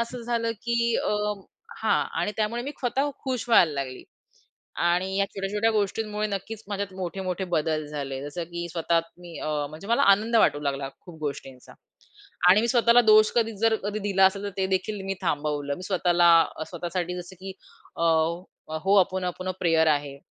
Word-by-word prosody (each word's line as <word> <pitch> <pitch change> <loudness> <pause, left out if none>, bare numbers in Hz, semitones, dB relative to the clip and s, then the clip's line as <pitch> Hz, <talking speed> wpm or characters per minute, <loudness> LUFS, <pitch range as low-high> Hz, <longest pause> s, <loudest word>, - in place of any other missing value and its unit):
असं 235 +1 -4
झालं 230 -1 -1
की 235 0 +1
अ, - - 0 0.7
हां, - - +2 0.2
आणि 210 - -1
त्यामुळे 225 +2 -1
मी 275 - -4
स्वतः 270 +3 0
खुश 255 -2 -3
व्हायला 175 -9 +5
लागली. 135 -2 -5 0.8
आणि 180 +3 +1
या 200 - +3
छोट्या-छोट्या 205 +3 0
गोष्टींमुळे 210 0 -1
नक्कीच 205 +2 -5
माझ्यात 200 -1 -3
मोठे-मोठे 185 +1 -3
बदल 155 -1 0
झाले 140 -3 -5
जसं 145 +4 -5
की 170 0 -4
स्वतः 165 0 +1 0.2
मी 175 -2 -10
अ, - - -4 0.2
म्हणजे 155 +6 -10
मला 235 - +3
आनंद 220 +4 +3
वाटू 145 -9 +4
लागला 140 -1 -2
खूप 175 -4 -13
गोष्टींचा. 135 -3 -6 0.8
आणि 200 +4 +6
मी 235 - 0
स्वतःला 235 0 +5
दोष 215 -1 +6
कधी 225 -1 +1
जर 225 +2 +3
कधी 210 +1 -2
दिला 195 -1 +3
असेल 195 +1 +1
तर 205 - -2
ते 190 -1 +1
देखील 195 +2 -2
मी 195 - -1
थांबवलं. 145 -4 -1
मी 180 - -9
स्वतःला 175 -2 +3 0.3
अ, - - -3
स्वतःसाठी 175 +1 -3
जसं 175 +2 -13
की 190 0 -7 0.4
अ, 165 - -1 0.8
Ho'oponopono 185 -1 +1
प्रेयर 165 -2 +3
आहे 145 -2 0
190 Hz, 170 wpm, -26 LUFS, 165-215 Hz, 0.8 s, आणि